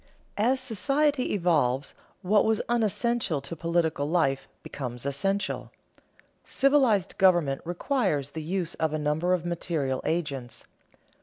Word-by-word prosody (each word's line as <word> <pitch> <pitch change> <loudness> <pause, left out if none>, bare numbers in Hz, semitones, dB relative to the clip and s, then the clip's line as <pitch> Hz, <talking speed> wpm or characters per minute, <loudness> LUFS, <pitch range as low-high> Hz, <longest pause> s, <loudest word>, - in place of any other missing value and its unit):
As 250 +5 +3
society 275 +4 +1
evolves, 150 -8 +1 0.3
what 205 +3 +4
was 220 -1 +1
unessential 235 - +1
to 140 +5 -7
political 165 -3 0
life 135 -6 +1 0.2
becomes 125 -3 -6
essential. 195 +9 -1 0.7
Civilized 265 - +2
government 175 -8 +3
requires 175 - -1
the 160 - -5
use 170 +1 -2
of 160 -1 -1
a - - 0
number 155 +4 +1
of 175 -1 -6
material 160 -6 -2
agents. 140 -8 -3
170 Hz, 120 wpm, -27 LUFS, 145-210 Hz, 0.7 s, what